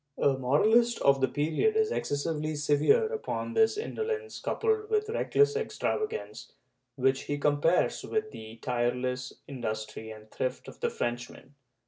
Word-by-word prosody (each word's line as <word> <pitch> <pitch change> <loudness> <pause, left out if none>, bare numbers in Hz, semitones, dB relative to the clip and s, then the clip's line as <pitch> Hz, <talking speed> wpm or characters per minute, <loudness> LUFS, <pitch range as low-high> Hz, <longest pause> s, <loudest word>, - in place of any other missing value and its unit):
"^ - - -1
A 140 -1 +4
moralist 215 - +3
of 135 -1 +4
the 130 - +4
period 155 - +1
is 440 0 +2
excessively 155 - -2
severe 150 - +3
upon 445 - -3
this 445 -1 +3
indolence 445 0 -3
coupled 435 -1 0
with 430 0 +1
reckless 435 -1 +2
extravagance, 450 0 -3 0.4
which 135 0 +1
he 145 - -2
compares 145 +4 +2
with 215 0 -2
the 110 0 -9
tireless 125 +1 -1 0.2
industry 110 -4 -5
and 110 0 -11
thrift 130 0 -3
of - - -11
the - - 0
Frenchman? 120 +3 -5
145 Hz, 140 wpm, -29 LUFS, -, 0.4 s, A